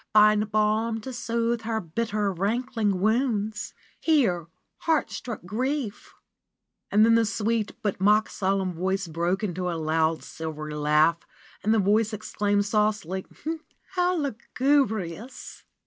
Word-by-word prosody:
Find 210 0 +5
balm 215 +2 +1
to 260 +3 -7
soothe 235 0 -1
her 220 0 -1
bitter, 210 +3 -1
rankling 210 0 0
wounds; 220 -1 0 0.2
Here 220 - +2 0.3
heart 320 -2 +1
struck 235 -7 -6
Grief 250 +3 -3 0.4
" - - -47
And 210 +2 +6
then 230 - +5
the 230 0 +5
sweet, 220 +1 -1
but 200 -3 -1
mock 210 +2 +4
solemn 190 -1 -1
voice 190 +2 -1
broke 170 +5 -1
into 180 -2 -2
a 170 - -2
loud, 160 0 +1
silvery 155 -1 -6
laugh 150 +3 +3 0.4
and 215 - +2
the 225 - +4
voice 215 +2 +2
exclaimed 205 -1 0
saucily: 210 -3 0 0.6
"How 360 -1 +1
lugubrious 255 - -1
210 Hz, 130 wpm, -26 LUFS, 185-230 Hz, 0.6 s, And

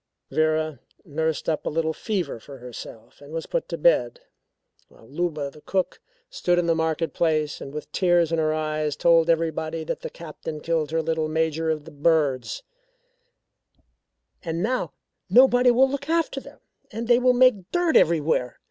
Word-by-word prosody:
Vera 155 -2 0 0.3
nursed 160 -1 -2
up 155 -2 0
a - - -2
little 160 0 -1
fever 175 - -3
for 135 +4 -12
herself 120 -1 -11
and 145 +1 -13
was 165 0 -4
put - - -3
to - - -3
bed, - - +2 0.7
while - - -20
Luba, 155 -5 -2
the 150 - -16
cook, 190 +2 -2 0.3
stood 175 0 0
in 175 - +2
the 165 - +3
market 160 -1 -1
place 155 -3 0
and 135 - -7
with 150 +1 -7
tears 175 -3 +2
in 165 - +1
her 155 -1 +1
eyes 155 -1 -1
told 165 -1 +4
everybody 160 -1 0
that - - -4
the - - -6
Captain 155 -1 -8
killed 160 -2 -1
her 160 0 0
little 160 -1 -1
Major 160 0 0
of 155 -2 -2
the 165 - -11
Birds 150 - 0 1.8
"and 165 0 -3
now 255 +4 -1 0.4
nobody 250 0 +6
will 250 +2 +5
look 280 +2 -5
after 330 0 0
them, - - -14 0.3
and 225 +2 -5
they 240 0 +5
will 250 0 +4
make 245 -7 +3
dirt 350 -2 +1
everywhere. 155 -6 +2
160 Hz, 170 wpm, -24 LUFS, 155-180 Hz, 1.8 s, nobody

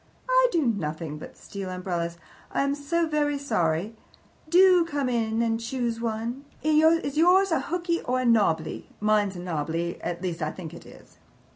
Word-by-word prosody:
"I - - +5
do 325 -4 +1
nothing 155 -8 -2
but - - -11
steal 195 -2 -7
umbrellas. 175 -2 -3 0.3
I - - +1
am 280 0 +1
so 320 +4 0
very 295 -2 0
sorry! 205 - -1 0.5
Do 360 +1 +6
come 290 -5 -2
in 225 -1 0
and 225 -1 0
choose 235 -1 -2
one. 230 +3 -3 0.2
Is 310 -1 +3
yours 365 +3 +5
a 325 - +3
hooky 340 +4 -2
or 255 +1 -1
a - - -2
nobbly? 200 -9 +1
Mine's 210 -2 +2
a - - -6
nobbly 170 0 -3
at 175 +1 -4
least, 175 -2 -3
I 155 - 0
THINK 165 0 -8
it 170 - -11
is." - - -17
230 Hz, 170 wpm, -26 LUFS, -, 0.5 s, Do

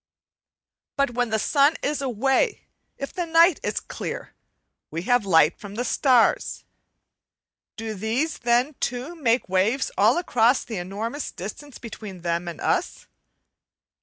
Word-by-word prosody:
But 275 -2 +2
when 245 -1 -1
the 220 - +1
sun 285 +7 +3
is 290 0 -1
away, 270 - +1 0.4
if 275 - -6
the 350 -2 -3
night 330 +1 +5
is - - -1
clear - - -6 0.6
we 165 +2 -4
have 245 -1 +2
light 160 -2 +4
from 205 -2 -9
the 245 +3 -2
starts. 250 -2 +2 1.1
Do 225 -1 -4
these 225 - -2
then 245 +4 +2
too 250 +7 -3
make 255 -7 +1
waves 195 +8 +1
all 215 +8 +5
across 250 -7 +2
the 225 -3 -6
enormous 215 +10 -4
distance 235 +9 -8
between 210 -5 -9
them 170 0 -2
and 170 -3 -6
us? - - -1
240 Hz, 135 wpm, -24 LUFS, 205-275 Hz, 1.1 s, night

